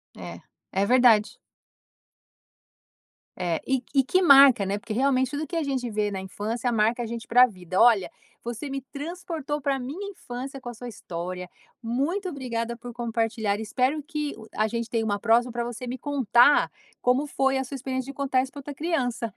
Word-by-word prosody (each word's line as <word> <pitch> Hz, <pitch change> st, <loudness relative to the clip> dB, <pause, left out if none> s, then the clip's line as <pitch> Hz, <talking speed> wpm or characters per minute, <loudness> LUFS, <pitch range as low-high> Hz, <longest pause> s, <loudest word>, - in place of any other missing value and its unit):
É, -, -, -9 dB, 0.3 s
é 195 Hz, +1 st, +1 dB
verdade. 240 Hz, -3 st, +4 dB, 2.0 s
É, 170 Hz, -3 st, -1 dB
e 265 Hz, -2 st, +1 dB
e 275 Hz, -, +5 dB
que 370 Hz, +8 st, +2 dB
marca, 275 Hz, -, +7 dB
né, 200 Hz, +2 st, -1 dB
porque 215 Hz, -, -6 dB
realmente 260 Hz, +1 st, +2 dB
tudo 295 Hz, +2 st, -3 dB
que 340 Hz, -, -3 dB
a 325 Hz, -, 0 dB
gente 260 Hz, -4 st, -2 dB
vê 210 Hz, 0 st, 0 dB
na 190 Hz, -1 st, -4 dB
infância 220 Hz, +6 st, -3 dB
marca 230 Hz, +2 st, +1 dB
a -, -, -3 dB
gente 230 Hz, 0 st, -6 dB
pra 250 Hz, +2 st, +7 dB
vida. 185 Hz, -4 st, -6 dB
Olha, 225 Hz, -6 st, +5 dB, 0.3 s
você 240 Hz, +4 st, -5 dB
me 275 Hz, 0 st, -3 dB
transportou 305 Hz, +1 st, -5 dB
para 275 Hz, -1 st, 0 dB
minha 310 Hz, +11 st, -5 dB
infância 265 Hz, -4 st, -7 dB
com 240 Hz, -, -7 dB
a -, -, -7 dB
sua 245 Hz, +2 st, -9 dB
história. 180 Hz, -3 st, -6 dB, 0.3 s
Muito 305 Hz, -, -1 dB
obrigada 235 Hz, -5 st, -4 dB
por 245 Hz, 0 st, -9 dB
compartilhar. 225 Hz, -3 st, -1 dB
Espero 255 Hz, +7 st, 0 dB
que 300 Hz, -1 st, -3 dB, 0.2 s
a 215 Hz, +1 st, +2 dB
gente 230 Hz, +1 st, -3 dB
tenha 230 Hz, -1 st, 0 dB
uma 205 Hz, -1 st, -1 dB
próxima, 235 Hz, +2 st, +3 dB
para 240 Hz, 0 st, -2 dB
você 240 Hz, +1 st, -6 dB
me 255 Hz, +2 st, -4 dB
contar 275 Hz, -1 st, +4 dB, 0.3 s
como 255 Hz, +4 st, +2 dB
foi 270 Hz, -1 st, +1 dB
a 265 Hz, -, 0 dB
sua 275 Hz, +2 st, -7 dB
experiência 260 Hz, +1 st, -4 dB
de -, -, -15 dB
contar 270 Hz, -2 st, +1 dB
isso 265 Hz, -, -8 dB
para 285 Hz, -, -9 dB
outra 285 Hz, +1 st, -7 dB
criança. 250 Hz, -8 st, -2 dB
245 Hz, 185 wpm, -26 LUFS, 225-275 Hz, 2.0 s, marca